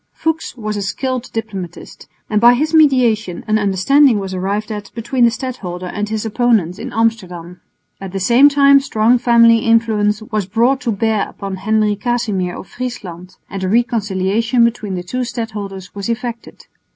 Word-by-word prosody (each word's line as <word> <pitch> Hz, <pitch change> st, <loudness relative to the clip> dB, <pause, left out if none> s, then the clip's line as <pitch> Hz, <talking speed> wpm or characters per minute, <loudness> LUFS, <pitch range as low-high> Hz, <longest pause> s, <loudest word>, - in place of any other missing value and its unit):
Fuchs 320 Hz, -5 st, -3 dB
was 215 Hz, -2 st, -4 dB
a -, -, -3 dB
skilled 255 Hz, +5 st, -3 dB
diplomatist, 195 Hz, -6 st, -7 dB, 0.2 s
and 210 Hz, -1 st, 0 dB
by 240 Hz, +1 st, +7 dB
his 310 Hz, +5 st, -1 dB
mediation 245 Hz, -, +2 dB
an 215 Hz, 0 st, +2 dB
understanding 220 Hz, +6 st, +3 dB
was 195 Hz, -1 st, -4 dB
arrived 200 Hz, +4 st, -3 dB
at 205 Hz, -1 st, -6 dB
between 240 Hz, +2 st, +1 dB
the -, -, +5 dB
stadholder 220 Hz, -7 st, -6 dB
and 205 Hz, +3 st, -4 dB
his 220 Hz, 0 st, -3 dB
opponents 220 Hz, -6 st, +1 dB
in 255 Hz, +2 st, -6 dB
Amsterdam. 185 Hz, -7 st, -2 dB, 0.4 s
At 195 Hz, -1 st, -7 dB
the 195 Hz, -, -4 dB
same 240 Hz, +9 st, +5 dB
time 280 Hz, -1 st, +5 dB
strong 240 Hz, -2 st, +2 dB
family 230 Hz, -1 st, +5 dB
influence 220 Hz, -2 st, +1 dB
was 215 Hz, -4 st, -3 dB
brought 240 Hz, +7 st, +1 dB
to 235 Hz, -, -1 dB
bear 215 Hz, 0 st, 0 dB
upon 195 Hz, -1 st, -7 dB
Henry 215 Hz, +1 st, +1 dB
Casimir 205 Hz, -5 st, -2 dB
of -, -, -10 dB
Friesland, 185 Hz, -8 st, -7 dB
and 195 Hz, -1 st, -6 dB
a 185 Hz, -, -1 dB
reconciliation 225 Hz, 0 st, +1 dB
between 220 Hz, -4 st, -2 dB
the 180 Hz, -, -4 dB
two 250 Hz, +8 st, -5 dB
stadholders 210 Hz, -6 st, -6 dB
was 200 Hz, +2 st, -5 dB
effected. 235 Hz, 0 st, -5 dB
220 Hz, 165 wpm, -17 LUFS, 195-240 Hz, 0.4 s, by